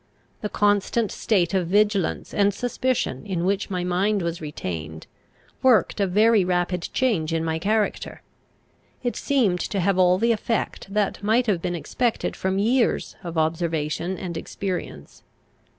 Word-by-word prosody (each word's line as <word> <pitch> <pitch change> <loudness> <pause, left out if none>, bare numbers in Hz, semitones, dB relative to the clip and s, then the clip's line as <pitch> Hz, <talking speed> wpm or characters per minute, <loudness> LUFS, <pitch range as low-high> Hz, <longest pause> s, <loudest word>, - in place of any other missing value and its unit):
The 210 - -3
constant 205 +2 +1
state 180 -6 +1
of 185 -3 +1
vigilance 205 -1 +1
and 200 -1 +2
suspicion 245 - -1
in 180 -3 -2
which 200 +2 0
my 180 -2 -2
mind 190 +3 +1
was 170 0 -3
retained, 80 - -6 0.6
worked 240 -5 +3
a 200 - +2
very 210 +2 +4
rapid 180 -1 -1
change 195 -12 0
in 165 0 0
my 160 0 -1
character. 210 +4 -1 0.8
It 245 - -1
seemed 225 -11 +1
to 195 - -2
have 190 +1 +1
all 180 0 +5
the 230 +4 +2
effect 225 -3 -2
that 205 -1 0
might 225 +4 +2
have 195 -7 0
been 175 0 -2
expected 235 +7 -1
from 190 0 -1
years 235 +5 +1
of 170 -2 -5
observation 160 +2 -1
and 175 -3 -5
experience. 175 - -5
190 Hz, 150 wpm, -24 LUFS, 170-210 Hz, 0.8 s, all